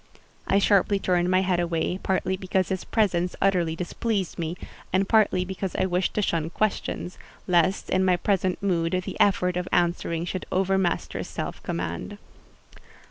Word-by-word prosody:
I 195 Hz, -, +3 dB
sharply 200 Hz, 0 st, +3 dB
turned 180 Hz, -2 st, +1 dB
my 185 Hz, 0 st, +4 dB
head 185 Hz, -2 st, +1 dB
away, 170 Hz, +1 st, -1 dB
partly 190 Hz, 0 st, 0 dB
because 185 Hz, 0 st, -1 dB
his 190 Hz, -2 st, -2 dB
presence 180 Hz, -5 st, 0 dB
utterly 180 Hz, -4 st, +2 dB
displeased 190 Hz, +2 st, -2 dB
me, 165 Hz, +1 st, -3 dB, 0.3 s
and 190 Hz, +1 st, +2 dB
partly 205 Hz, -5 st, +3 dB
because 190 Hz, 0 st, -4 dB
I -, -, +1 dB
wished 180 Hz, 0 st, 0 dB
to 210 Hz, -, +1 dB
shun 165 Hz, -3 st, 0 dB
questions: 195 Hz, -1 st, -2 dB, 0.3 s
lest, 175 Hz, +1 st, +2 dB
in 185 Hz, 0 st, +3 dB
my 185 Hz, -1 st, +3 dB
present 185 Hz, 0 st, 0 dB
mood, 175 Hz, -2 st, +1 dB
the -, -, -6 dB
effort 180 Hz, -3 st, +3 dB
of 180 Hz, 0 st, -2 dB
answering 170 Hz, -1 st, 0 dB
should 185 Hz, +1 st, -4 dB
overmaster 190 Hz, -1 st, 0 dB
self -, -, -5 dB
command. 85 Hz, 0 st, -4 dB
185 Hz, 155 wpm, -25 LUFS, 175-190 Hz, 0.3 s, my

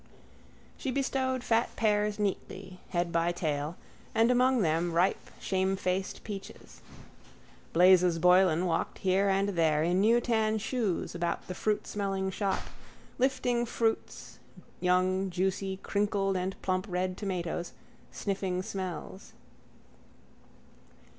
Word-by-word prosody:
She 270 Hz, -, -3 dB
bestowed 260 Hz, -1 st, -1 dB
fat 230 Hz, 0 st, +1 dB
pears 210 Hz, -1 st, +1 dB
neatly, 195 Hz, -2 st, -4 dB
head 175 Hz, -2 st, -1 dB
by 170 Hz, +1 st, +1 dB
tail, 155 Hz, -2 st, -2 dB, 0.4 s
and 230 Hz, +2 st, +4 dB
among 250 Hz, -2 st, +3 dB
them 165 Hz, +1 st, +1 dB
ripe 175 Hz, +3 st, +1 dB
shamefaced 190 Hz, 0 st, -1 dB
peaches. 200 Hz, -3 st, -9 dB, 0.9 s
Blazes 180 Hz, 0 st, +5 dB
Boylan 180 Hz, 0 st, +4 dB
walked 165 Hz, -2 st, -1 dB
here 190 Hz, +1 st, +2 dB
and 195 Hz, +1 st, +2 dB
there 160 Hz, -5 st, +2 dB
in 175 Hz, +3 st, +2 dB
new 230 Hz, +3 st, +5 dB
tan 220 Hz, -2 st, +1 dB
shoes 220 Hz, -4 st, -2 dB
about 170 Hz, 0 st, -2 dB
the 185 Hz, -, -5 dB
fruitsmelling 195 Hz, -1 st, -1 dB
shop, 195 Hz, 0 st, -1 dB, 0.6 s
lifting 250 Hz, -2 st, +1 dB
fruits, 225 Hz, -1 st, -2 dB, 0.4 s
young 185 Hz, +1 st, +2 dB
juicy 190 Hz, +1 st, -1 dB
crinkled 200 Hz, -1 st, 0 dB
and 185 Hz, +1 st, -3 dB
plump 185 Hz, +2 st, -1 dB
red 180 Hz, 0 st, -1 dB
tomatoes, 175 Hz, -3 st, -3 dB, 0.4 s
sniffing 190 Hz, -2 st, -2 dB
smells. 185 Hz, 0 st, -6 dB
190 Hz, 110 wpm, -30 LUFS, 180-210 Hz, 0.9 s, Blazes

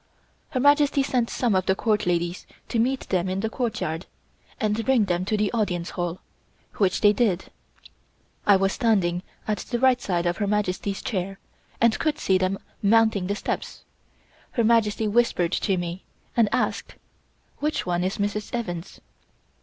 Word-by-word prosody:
Her 255 Hz, -, -2 dB
Majesty 285 Hz, 0 st, +4 dB
sent 250 Hz, -3 st, 0 dB
some 240 Hz, -4 st, 0 dB
of 185 Hz, -1 st, +1 dB
the 190 Hz, -, +3 dB
Court 210 Hz, -2 st, 0 dB
ladies 175 Hz, 0 st, -1 dB, 0.2 s
to 230 Hz, -, 0 dB
meet 260 Hz, +3 st, +1 dB
them 185 Hz, -1 st, +1 dB
in 190 Hz, +1 st, -1 dB
the 220 Hz, +1 st, -2 dB
courtyard, 195 Hz, -, -3 dB, 0.5 s
and 215 Hz, -1 st, 0 dB
bring 245 Hz, -3 st, +3 dB
them 180 Hz, -1 st, -1 dB
to 215 Hz, +2 st, 0 dB
the 210 Hz, -1 st, +1 dB
Audience 185 Hz, -7 st, -1 dB
Hall, 175 Hz, -1 st, -3 dB, 0.6 s
which 195 Hz, -2 st, +2 dB
they 205 Hz, -1 st, +6 dB
did. 200 Hz, -5 st, 0 dB, 1.0 s
I 205 Hz, -, +7 dB
was 195 Hz, 0 st, +2 dB
standing 190 Hz, -8 st, +1 dB, 0.3 s
at 210 Hz, -3 st, 0 dB
the 240 Hz, -, -3 dB
right 255 Hz, 0 st, +3 dB
side 175 Hz, -5 st, -1 dB
of 175 Hz, 0 st, 0 dB
Her 205 Hz, -, -1 dB
Majesty's 200 Hz, -1 st, -1 dB
chair, 195 Hz, -2 st, -3 dB, 0.4 s
and 230 Hz, -1 st, +3 dB
could 310 Hz, -2 st, 0 dB
see 190 Hz, -10 st, +2 dB
them 185 Hz, +1 st, 0 dB, 0.2 s
mounting 215 Hz, -2 st, +3 dB
the 200 Hz, -, -1 dB
steps. -, -, -4 dB, 0.7 s
Her 235 Hz, -, +1 dB
Majesty 220 Hz, -1 st, +3 dB
whispered 210 Hz, -6 st, +2 dB
to 195 Hz, -1 st, 0 dB
me, 175 Hz, +1 st, -4 dB, 0.3 s
and 230 Hz, -3 st, +4 dB
asked: 250 Hz, +2 st, -1 dB, 0.6 s
"Which 300 Hz, +1 st, -1 dB
one 175 Hz, 0 st, 0 dB
is 190 Hz, +2 st, -1 dB
Mrs. 205 Hz, +2 st, -2 dB
Evans?" 175 Hz, -7 st, -5 dB
205 Hz, 165 wpm, -25 LUFS, 185-230 Hz, 1.0 s, I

